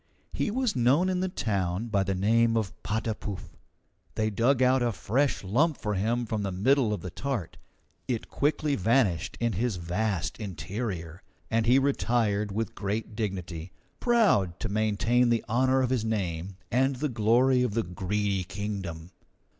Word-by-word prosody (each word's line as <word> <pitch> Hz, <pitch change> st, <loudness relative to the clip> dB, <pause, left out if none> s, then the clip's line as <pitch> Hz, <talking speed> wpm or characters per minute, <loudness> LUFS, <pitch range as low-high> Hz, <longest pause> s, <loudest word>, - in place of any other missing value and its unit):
He -, -, 0 dB
was 250 Hz, -, 0 dB
known 135 Hz, +9 st, +3 dB
in 185 Hz, -1 st, 0 dB
the 185 Hz, 0 st, 0 dB
town 100 Hz, -, -1 dB
by 100 Hz, -2 st, +2 dB
the 95 Hz, 0 st, -1 dB
name 115 Hz, +4 st, +3 dB
of 105 Hz, -4 st, -1 dB
Patapouf. 105 Hz, -6 st, -4 dB, 0.6 s
They 110 Hz, 0 st, 0 dB
dug 125 Hz, +5 st, +3 dB
out 130 Hz, 0 st, +4 dB
a 120 Hz, -1 st, +2 dB
fresh 125 Hz, +8 st, 0 dB
lump 140 Hz, -, +2 dB
for 105 Hz, -2 st, -2 dB
him 115 Hz, +5 st, 0 dB
from 110 Hz, -1 st, -2 dB
the 100 Hz, -1 st, -2 dB
middle 120 Hz, +5 st, +2 dB
of 105 Hz, -4 st, -2 dB
the 90 Hz, -, -6 dB
tart. 125 Hz, -, -4 dB, 0.5 s
It 120 Hz, -3 st, -2 dB
quickly 150 Hz, 0 st, 0 dB
vanished 105 Hz, -, +1 dB
in 115 Hz, -1 st, 0 dB
his 115 Hz, +3 st, 0 dB
vast 90 Hz, +3 st, -2 dB
interior, 95 Hz, -, -5 dB, 0.3 s
and 115 Hz, 0 st, +1 dB
he 125 Hz, +3 st, +6 dB
retired 115 Hz, -6 st, +1 dB
with 110 Hz, +3 st, -2 dB
great 105 Hz, +2 st, -3 dB
dignity, 90 Hz, -5 st, -4 dB, 0.3 s
proud 200 Hz, -, +3 dB
to 110 Hz, -, -2 dB
maintain 110 Hz, +4 st, +2 dB
the 115 Hz, -1 st, +1 dB
honour 130 Hz, +3 st, +2 dB
of 130 Hz, -, 0 dB
his 125 Hz, -4 st, +1 dB
name 95 Hz, -4 st, -2 dB
and 130 Hz, +3 st, +2 dB
the 150 Hz, +4 st, -1 dB
glory 125 Hz, +2 st, +3 dB
of 120 Hz, -4 st, 0 dB
the 115 Hz, -, +1 dB
Greedy 95 Hz, +2 st, -1 dB
Kingdom. 90 Hz, -3 st, -5 dB
110 Hz, 160 wpm, -28 LUFS, 95-125 Hz, 0.6 s, he